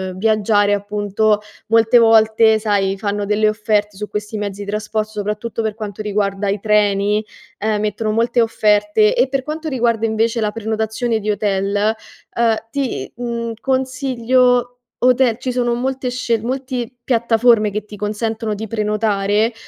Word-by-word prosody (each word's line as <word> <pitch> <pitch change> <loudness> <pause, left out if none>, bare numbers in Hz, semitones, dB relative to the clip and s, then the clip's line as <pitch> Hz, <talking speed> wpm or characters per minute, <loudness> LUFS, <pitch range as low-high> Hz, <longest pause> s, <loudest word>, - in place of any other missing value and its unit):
viaggiare. 205 0 +2
Appunto, 205 +1 0 0.3
molte 225 +2 +5
volte 220 -1 +5
sai, 200 -2 0
fanno 205 +1 -2
delle 210 +1 +2
offerte 210 -1 0
su 210 +2 -6
questi 210 +1 -4
mezzi 205 -1 -4
di - - -8
traspor 215 +1 -2
soprattutto 210 +2 -4
per 220 -1 -2
quanto 215 -2 -6
riguarda 205 -1 -1
i 200 +1 -1
treni, 210 0 +2 0.4
ehm, 215 0 0
mettono 215 +1 -1
molte 235 +2 +2
offerte. 210 -1 +2
E 255 +2 +2
per 270 -1 -1
quanto 310 +2 -4
riguarda 235 -4 0
invece 225 +1 0
la 210 -1 0
prenotazione 220 +1 -2
di 210 0 -1
hotel, 200 -1 -1 0.6
ehm, 230 -1 +3 0.2
ti, 265 - -3
mhmm, 235 -1 -4
consiglio 255 -2 +1 0.3
hotel, 250 -2 +3
ci 255 0 -3
sono 240 -1 0
molte 260 +1 -2
scelt 235 -3 -1
multi 255 -1 -3
piattaforme 230 -2 +3
che 210 +1 -4
ti 210 - -10
consentono 215 +2 -3
di 215 +2 -5
prenotare 210 0 0
220 Hz, 145 wpm, -18 LUFS, 210-235 Hz, 0.6 s, molte